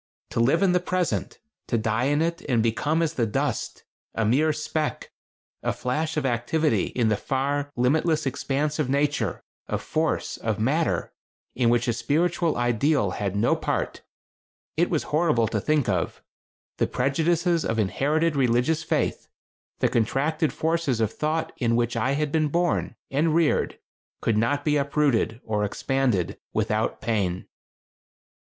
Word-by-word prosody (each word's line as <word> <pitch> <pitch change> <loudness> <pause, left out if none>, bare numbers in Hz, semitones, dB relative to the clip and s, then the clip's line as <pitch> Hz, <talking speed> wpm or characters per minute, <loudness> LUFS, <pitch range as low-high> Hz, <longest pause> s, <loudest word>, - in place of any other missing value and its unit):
To - - -1
live 135 +10 +3
in 190 - +4
the 180 - +3
Present; 180 -1 -1 0.3
to 120 - +1
die 110 +2 0
in 145 +3 +2
it 170 0 -2
and 115 -4 +3
become 150 +8 +1
as 165 -1 -1
the 120 -7 0
dust; 135 +1 -2 0.3
a 115 - +1
mere 145 +8 +3
speck, 155 0 -3 0.5
a - - 0
flash 155 +5 -2
of 150 - 0
activity 135 +6 +1
in 115 -3 0
the 110 - +3
far, 140 +5 -1
limitless 155 +5 +2
expanse 145 +3 -1
of 145 -4 0
Nature, 145 +2 0 0.2
of - - -3
Force, 160 +1 -1
of 110 -2 -2
Matter 150 +9 0 0.4
in 120 -1 +2
which 120 +1 +2
a 120 - +2
spiritual 160 +7 +1
ideal 120 -1 +2
had 100 0 -3
no 105 +4 +3
part. - - -2 0.7
It 170 +2 +2
was 160 - 0
horrible 150 -8 +3
to 110 -2 -1
think 150 0 +1
of. 90 -5 -1 0.5
The - - +1
prejudices 165 +5 +1
of 115 - -1
inherited 150 - +1
religious 130 +4 +2
faith, 160 - -1 0.5
the - - +4
contracted 145 +7 +1
forces 160 -6 0
of 110 -1 0
thought 155 +1 -1
in 115 -2 +1
which 120 0 0
I 125 +4 +1
had 150 0 -1
been 155 -1 +2
born 170 +3 0 0.2
and 155 +3 +2
reared 165 -3 +2 0.4
could 115 - +1
not 130 +7 +1
be 150 -1 +3
uprooted 140 -5 +1
or 105 -1 -1
expanded 105 -4 0
without 110 0 0
pain. 100 -5 -1
140 Hz, 155 wpm, -25 LUFS, 115-155 Hz, 0.7 s, in